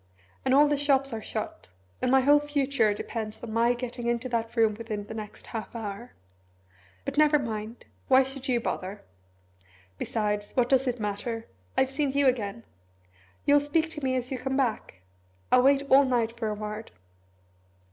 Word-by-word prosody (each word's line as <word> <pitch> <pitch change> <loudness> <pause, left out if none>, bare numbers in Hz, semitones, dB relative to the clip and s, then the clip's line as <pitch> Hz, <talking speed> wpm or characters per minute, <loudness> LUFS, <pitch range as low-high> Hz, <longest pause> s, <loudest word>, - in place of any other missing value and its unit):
"And 260 - +1
all 295 +1 +7
the 290 0 +1
shops 275 -2 +2
are 220 - -4
shut 215 - -5 0.3
and - - +1
my 265 +1 +5
whole 290 +3 +6
future 280 -6 +1
depends 215 +1 -5
on 225 -2 -5
my 235 +2 +3
getting 240 -1 -5
into 240 +1 0
that 230 -1 -2
room 225 -2 +4
within 215 -1 -5
the 215 - -8
next 215 -1 -8
half 225 +1 -5
hour. 220 +1 -6 0.9
But - - -1
never 300 0 +6
mind! 225 -3 -5 0.2
Why 265 0 +6
should 270 0 -6
you 245 -2 +2
bother? 200 -3 -4 1.0
Besides, 210 -2 -2
what 245 -2 +2
does 265 0 +3
it 245 -1 -1
matter? 215 +2 -3 0.3
I've 265 0 +3
seen 275 -1 0
you 280 0 +3
again. 230 -4 0 0.8
You'll 290 0 +6
speak 315 +3 0
to 300 -3 -7
me 260 -1 +1
as 250 0 -2
you 260 - -2
come 265 0 -2
back? 225 - -1 0.5
I'll 250 - +7
wait 275 +1 +4
all 275 +1 +7
night 235 -3 0
for 230 -2 -3
a 210 - -2
word." 210 +1 -6
245 Hz, 175 wpm, -27 LUFS, 220-270 Hz, 1.0 s, all